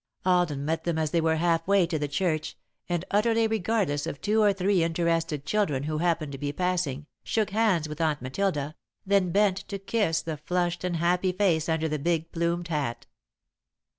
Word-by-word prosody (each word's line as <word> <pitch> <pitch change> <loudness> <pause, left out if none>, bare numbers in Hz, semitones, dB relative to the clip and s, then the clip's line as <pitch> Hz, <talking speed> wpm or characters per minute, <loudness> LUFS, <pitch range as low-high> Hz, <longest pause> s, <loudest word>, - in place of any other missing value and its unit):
Alden 175 -6 +2
met 160 +1 -1
them 170 -2 -1
as 155 -1 0
they 170 - +2
were 160 0 +2
half 165 0 +1
way 200 -2 +4
to 165 -2 -2
the 145 - -1
church, 155 +1 -1 0.3
and, 175 0 -1
utterly 225 +2 +3
regardless 210 -8 0
of 140 - -5
two 215 +1 +2
or 205 -1 +5
three 195 -1 +1
interested 165 -3 0
children 155 -8 0
who 155 +1 -2
happened 165 -3 0
to 135 - -7
be 145 0 -2
passing, 165 -4 -1 0.2
shook 220 -3 0
hands 200 -7 +2
with 150 +1 -6
Aunt 155 -2 +1
Matilda, 145 +2 -2 0.3
then 195 -2 +2
bent 200 0 +3
to 200 0 -6
kiss 195 -4 0
the 160 -2 -4
flushed 175 +3 -1
and 180 -1 -1
happy 180 +3 +1
face 180 -5 +1
under 160 0 +1
the 155 -1 -2
big 165 +1 -1
plumed 170 0 -1
hat. 145 -7 -2
170 Hz, 190 wpm, -27 LUFS, 155-190 Hz, 0.3 s, or